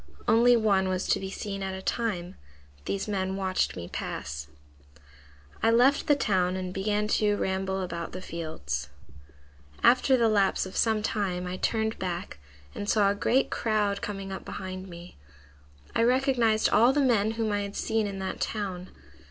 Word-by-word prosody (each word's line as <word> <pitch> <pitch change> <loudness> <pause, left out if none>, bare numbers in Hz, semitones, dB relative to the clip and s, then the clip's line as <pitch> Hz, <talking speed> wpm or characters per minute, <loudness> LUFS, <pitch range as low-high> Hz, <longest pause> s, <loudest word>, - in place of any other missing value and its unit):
Only 240 +2 +6
one 195 -4 +2
was 185 0 -1
to - - +3
be 190 - -5
seen 195 0 -5
at 190 0 -3
a 190 - -6
time. 185 -7 -2 0.5
These 200 +1 -2
men 190 -2 -1
watched 190 -1 0
me 85 -1 -6
pass. 70 -3 -5 1.1
"I - - +4
left 250 +7 +4
the 295 - +5
town 185 -8 +1
and 185 -1 -4
began 210 +2 0
to 210 -1 +2
ramble 190 -1 -1
about 170 -2 -5
the 185 - -6
fields. 75 - -5 0.9
"After 255 +2 +5
the 230 -2 +3
lapse 200 -4 +2
of 190 - -9
some 220 -2 +2
time 190 -5 -1
I 180 +1 -4
turned 220 +1 -1
back 175 - -4 0.3
and 205 - -5
saw 205 -2 +4
a - - +1
great 250 +6 +1
crowd 210 -3 0
coming 195 -2 -5
up 190 - -6
behind 185 0 -6
me. 170 - -11 0.8
I - - +3
recognized 240 -3 +3
all 235 +4 +6
the 290 - +1
men 225 -5 +2
whom 225 -1 -1
I 205 - +1
had 200 0 -5
seen 220 -1 0
in 200 -1 -5
that 190 0 -4
town. 190 -4 -3
200 Hz, 170 wpm, -28 LUFS, 185-220 Hz, 1.1 s, Only